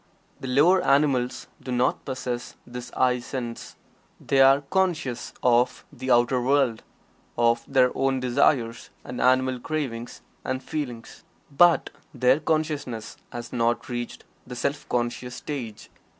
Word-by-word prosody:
The 130 Hz, -, -6 dB
lower 155 Hz, +9 st, +4 dB
animals 135 Hz, -3 st, +2 dB, 0.2 s
do 130 Hz, -, -6 dB
not 125 Hz, +2 st, 0 dB
possess 125 Hz, -2 st, -4 dB
this 125 Hz, 0 st, -8 dB
"I" 125 Hz, -1 st, +3 dB
sense. 120 Hz, -1 st, -6 dB, 0.4 s
They 135 Hz, -1 st, +2 dB
are 135 Hz, +1 st, +6 dB
conscious 155 Hz, -6 st, -1 dB
of 125 Hz, 0 st, +2 dB
the 130 Hz, -1 st, -6 dB
outer 120 Hz, +1 st, +3 dB
world; 130 Hz, -3 st, +2 dB, 0.6 s
of 115 Hz, 0 st, +3 dB
their 130 Hz, -2 st, +4 dB
own 135 Hz, -1 st, +1 dB
desires 125 Hz, -2 st, +1 dB
and 125 Hz, -, -6 dB
animal 130 Hz, 0 st, +3 dB
cravings 120 Hz, -5 st, -4 dB, 0.2 s
and 130 Hz, 0 st, -3 dB
feelings. 125 Hz, -7 st, -6 dB, 0.3 s
But 175 Hz, +3 st, +5 dB, 0.2 s
their 130 Hz, +3 st, +4 dB
consciousness 150 Hz, -8 st, -2 dB
has 120 Hz, -1 st, -7 dB
not 120 Hz, 0 st, 0 dB
reached 120 Hz, -1 st, -5 dB, 0.2 s
the 125 Hz, -, -7 dB
Self 140 Hz, +4 st, -3 dB
conscious 125 Hz, +1 st, -2 dB
stage. 125 Hz, -8 st, -6 dB
125 Hz, 130 wpm, -25 LUFS, 120-140 Hz, 0.6 s, are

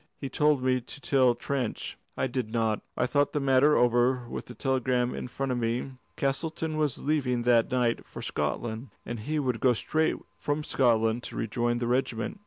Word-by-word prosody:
He 135 Hz, -, -5 dB
told 150 Hz, -3 st, +2 dB
me 130 Hz, 0 st, +2 dB
to 125 Hz, -, -11 dB
tell 130 Hz, -3 st, +3 dB
Trench. 125 Hz, -1 st, -3 dB, 0.2 s
I -, -, +1 dB
did 125 Hz, -3 st, -2 dB
not. 110 Hz, -2 st, 0 dB, 0.2 s
I -, -, +2 dB
thought 145 Hz, +3 st, +1 dB
the 150 Hz, -, +1 dB
matter 135 Hz, +2 st, +4 dB
over 120 Hz, +1 st, +3 dB
with -, -, -5 dB
the 125 Hz, -, -9 dB
telegram 130 Hz, -2 st, +1 dB
in -, -, -5 dB
front 135 Hz, +2 st, -3 dB
of 125 Hz, -, 0 dB
me. 120 Hz, +3 st, -1 dB, 0.2 s
Castleton 155 Hz, +3 st, -1 dB
was 150 Hz, -4 st, 0 dB
leaving 130 Hz, -5 st, +1 dB
that 120 Hz, -1 st, +4 dB
night 125 Hz, -2 st, +1 dB
for -, -, -8 dB
Scotland, 110 Hz, -, -3 dB, 0.2 s
and 120 Hz, -1 st, -4 dB
he 150 Hz, +9 st, -2 dB
would 125 Hz, -5 st, 0 dB
go 125 Hz, -2 st, +4 dB
straight 160 Hz, +7 st, +1 dB, 0.2 s
from 145 Hz, +1 st, -1 dB
Scotland 115 Hz, -4 st, +2 dB
to -, -, -7 dB
rejoin 120 Hz, +2 st, 0 dB
the 120 Hz, -, -2 dB
regiment. 125 Hz, -, -1 dB
125 Hz, 190 wpm, -28 LUFS, 120-140 Hz, 0.2 s, matter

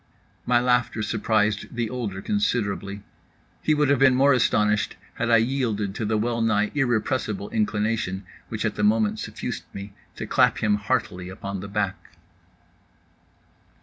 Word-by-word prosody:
My 120 Hz, -1 st, +4 dB
laughter 125 Hz, -3 st, +1 dB
surprised 110 Hz, 0 st, 0 dB
the 120 Hz, -1 st, 0 dB
older 105 Hz, -5 st, -4 dB
considerably. 100 Hz, -, -1 dB, 0.6 s
He 155 Hz, -, +2 dB
would 150 Hz, -1 st, +2 dB
have 140 Hz, -3 st, +3 dB
been 135 Hz, -1 st, +6 dB
more 140 Hz, +2 st, +5 dB
astonished 105 Hz, -4 st, +2 dB, 0.2 s
had 115 Hz, -, -2 dB
I 115 Hz, -, +7 dB
yielded 115 Hz, -5 st, 0 dB
to 110 Hz, -, -3 dB
the 110 Hz, +1 st, +1 dB
well 115 Hz, +2 st, 0 dB
nigh 105 Hz, -2 st, +2 dB
irrepressible 120 Hz, -5 st, -1 dB
inclination, 105 Hz, -3 st, -1 dB, 0.3 s
which -, -, -3 dB
at -, -, 0 dB
the 105 Hz, -, -3 dB
moment 105 Hz, 0 st, +2 dB
suffused -, -, -5 dB
me, 100 Hz, +1 st, -7 dB, 0.2 s
to -, -, -5 dB
clap -, -, +3 dB
him 105 Hz, -1 st, +2 dB
heartily 90 Hz, -2 st, -2 dB
upon 100 Hz, +1 st, -5 dB
the 100 Hz, -, -6 dB
back. 100 Hz, -1 st, -3 dB
110 Hz, 150 wpm, -25 LUFS, 105-120 Hz, 0.6 s, I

